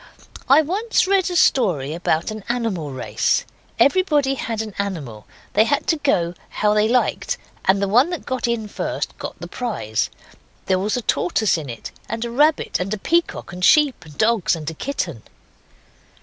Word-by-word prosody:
I 290 +4 +7
once 415 +9 +1
read 385 -1 +2
a 355 - -3
story 175 - +2
about 165 +1 0
an 215 -1 -7
animal 225 -11 -1
race. 130 -1 0 0.3
Everybody 290 -4 +3
had 230 -4 -3
an 215 -2 -8
animal, 150 - -4 0.2
and - - -35
they 215 - +5
had 285 +3 0
to 325 - +3
go 180 - +1 0.2
how 210 0 +1
they 210 0 +3
liked, 255 - +1 0.3
and 190 +1 +4
the 200 - 0
one 245 - +4
that 350 -3 -5
got 255 -1 -2
in 235 -2 -1
first - - -4
got - - -6
the - - -7
prize. 205 - -2 0.6
There 185 -1 +2
was 210 +5 0
a 245 - -3
tortoise 205 +2 +1
in 155 -5 -5
it, 115 -2 -7 0.2
and 225 +1 -3
a 235 - -5
rabbit, 295 +5 +2
and 185 +2 -3
a 215 - -1
peacock, 335 - -1
and 180 0 -7
sheep, 290 -3 +4
and 150 -3 -14
dogs, 220 -5 +2
and 155 -2 -8
a - - -8
kitten. 170 - -4
220 Hz, 185 wpm, -21 LUFS, 175-280 Hz, 0.6 s, I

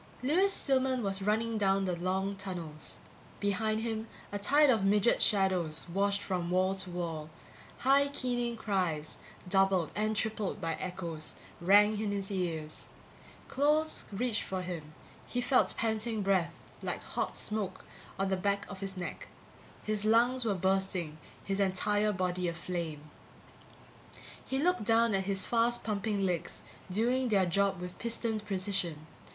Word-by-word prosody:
Lewis 360 +9 +3
Stillman 260 - +2
was 195 -1 -1
running 220 +2 +1
down 195 -1 +2
the 180 -2 0
long 190 +3 -1
tunnels. 175 -6 -6 0.4
Behind 215 +2 0
him 225 -1 -3 0.2
a 205 - -3
tide 285 +7 +5
of 220 -5 +2
midget 205 +3 +4
shadows 185 -6 +2
washed 200 +3 +1
from 180 -3 -2
wall 185 +1 +2
to 190 -1 -4
wall; 165 -3 -4 0.5
high 275 +2 +4
keening 245 -4 -2
cries, 180 -8 -1 0.3
doubled 190 -2 +3
and 215 +1 0
tripled 215 -2 -1
by 165 0 -1
echoes, 170 -4 -5 0.3
rang 205 +4 +5
in 210 -2 -1
his 200 0 -3
ears. 165 -5 -3 0.6
Claws 300 +3 +1
reached 225 +2 0
for 185 -1 -3
him; 160 -4 -6 0.3
he 245 - -2
felt 250 +1 +3
panting 220 -1 -1
breath, 180 -4 +1 0.2
like - - -3
hot - - -3
smoke, 205 -3 -3 0.3
on 195 0 0
the 190 - +2
back 200 +2 0
of 195 - -7
his 195 -1 -4
neck; 175 - -5 0.6
his 215 -1 -1
lungs 240 +4 +4
were 215 -4 +1
bursting, 190 -4 0 0.2
his 195 0 -1
entire 205 +2 +2
body 180 -2 -1
aflame. 165 -3 -4 1.4
He 265 - -2
looked 340 -3 +2
down 225 +1 +4
at 190 -1 0
his 195 -1 +1
fast 240 +1 +1
pumping 205 -2 -1
legs, 175 -2 -2 0.3
doing 245 +7 +1
their 200 -5 +3
job 195 +1 +1
with 180 0 -7
pistoned 230 -2 -1
precision. 185 -5 -1
200 Hz, 145 wpm, -31 LUFS, 180-220 Hz, 1.4 s, tide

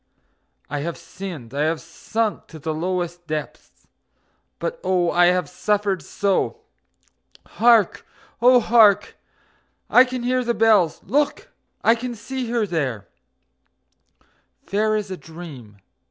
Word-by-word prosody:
I 145 0 -3
have 170 +3 -4
sinned, 170 -11 -9
I 140 - -1
have 160 0 0
sunk 215 +6 -3
to 160 - -11
the 155 +1 -3
lowest 175 +1 -3
depths 155 -1 -6 0.7
but - - -4
oh, 180 -2 +1
I 175 0 +5
have 180 0 +2
suffered 205 -3 -1
so! 200 -1 -1 0.8
Hark! 230 -4 +3 0.4
Oh, 250 +1 +7
hark! 220 -3 +4 0.8
I 250 - +8
can 255 -1 -5
hear 255 +1 +1
the 235 -1 -1
bells!... 215 -7 +3
Look! 290 +2 0 0.3
I 225 - +6
can 240 +1 -5
see 255 +2 -5
her 235 -2 +1
there, 135 - -3 1.6
Fair 215 +2 +1
as 210 -2 -3
a 185 - -4
dream... 150 -12 -11
195 Hz, 125 wpm, -22 LUFS, 165-230 Hz, 1.6 s, I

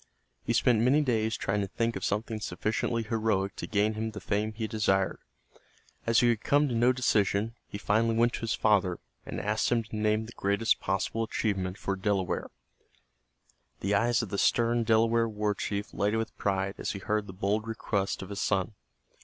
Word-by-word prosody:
He 115 - 0
spent 120 -1 +3
many 135 +6 +4
days 110 -5 0
trying 100 +1 -1
to 100 - -2
think 115 +4 -1
of 95 - -5
something 110 +2 -1
sufficiently 115 +2 -1
heroic 110 -4 0
to - - -5
gain 105 0 +1
him 110 +1 -3
the 110 -1 -7
fame 105 +1 -1
he 110 +1 -4
desired. 105 -3 +1 0.9
As 115 -1 +4
he 120 -1 +5
could 105 - -21
come 145 +1 +3
to 125 - -2
no 120 +2 +4
decision, 110 -3 +1
he - - -6
finally 110 +3 +1
went 120 +1 +3
to - - -4
his 115 -1 0
father, 95 -5 +2 0.3
and - - -4
asked 105 +3 0
him 115 -1 +2
to 110 - -9
name 110 +1 +1
the 115 - -10
greatest 100 +1 +1
possible 95 +4 -1
achievement 100 -4 -1
for 100 - -2
a 95 - -6
Delaware. 100 -2 0 1.3
The 100 +2 0
eyes 115 +3 +2
of 110 - -6
the 100 - -2
stern 120 0 +2
Delaware 115 +1 +3
war 105 -1 -1
chief 100 +1 -4
lighted 105 +2 +1
with 115 0 -3
pride 95 0 -1
as - - -2
he - - -5
heard 105 +1 -1
the - - -7
bold 100 +4 -1
request 100 -4 -2
of 95 - -9
his 100 -1 -4
son. 95 +1 0
110 Hz, 195 wpm, -29 LUFS, 100-115 Hz, 1.3 s, he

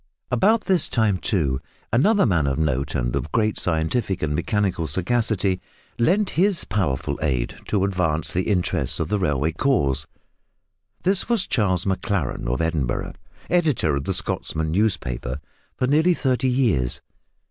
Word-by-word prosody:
About 215 +3 +3
this 185 -5 +2
time, 110 -5 +1
too, 70 - 0 0.3
another 200 - +4
man 85 - +2
of 70 - 0
note 70 -3 -1
and - - -1
of - - -3
great 110 -2 +1
scientific 85 +4 -1
and 75 -1 0
mechanical 95 -1 0
sagacity 95 - +1 0.4
lent 190 - +2
his 190 +1 +2
powerful 90 -10 -1
aid 65 -6 -1
to 100 -3 +1
advance 90 -5 0
the 90 +1 0
interests 90 - +1
of - - -2
the 105 0 +1
railway 75 -3 +1
cause. 80 - +1 1.0
This 190 +4 +1
was 230 -5 +3
Charles 95 -6 0
Maclaren, 95 - -1
of 65 +6 0
Edinburgh, 80 -6 -1 0.3
editor 150 - +2
of 70 0 -3
the 95 - 0
Scotsman 80 -3 -2
newspaper 70 - -1 0.4
for - - +1
nearly 160 +6 +3
thirty 130 -2 +1
years. 110 - +1
95 Hz, 145 wpm, -23 LUFS, 75-125 Hz, 1.0 s, another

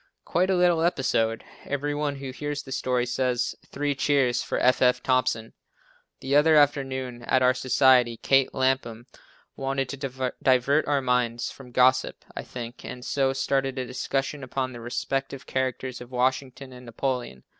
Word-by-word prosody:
Quite 185 +2 +1
a 190 - +3
little 175 -2 +3
episode. 120 -9 +1 0.2
Every 145 +1 -2
one 145 -1 -2
who 135 -1 -6
hears 145 +2 -4
the 135 - -11
story, 125 -1 0
says: 125 0 -1
"Three 145 0 -2
cheers 135 -3 +1
for - - -3
F. 125 +1 +3
F. 125 -1 +3
Thompson." 125 -3 0 0.7
The 135 +1 0
other 155 +2 +5
afternoon 135 -4 +1
at 130 - +2
our 125 0 +5
society 130 -2 +3
Kate 135 +2 +3
Lapham 130 -3 -1 0.5
wanted 135 -1 -2
to 130 -2 -3
divert 135 +4 +3
our 145 -2 +2
minds 125 -1 0
from 135 -2 -13
gossip 130 +1 +2
I - - -3
think, 120 -1 -8
and 125 0 -8
so 135 -1 +1
started 135 0 -1
a 130 - -2
discussion 135 +3 -3
upon 130 0 -3
the 120 - -9
respective 135 +3 -3
characters 130 -1 -3
of 125 - -10
Washington 130 +1 -2
and 125 -1 -12
Napoleon. 120 - -3
130 Hz, 160 wpm, -26 LUFS, 125-135 Hz, 0.7 s, other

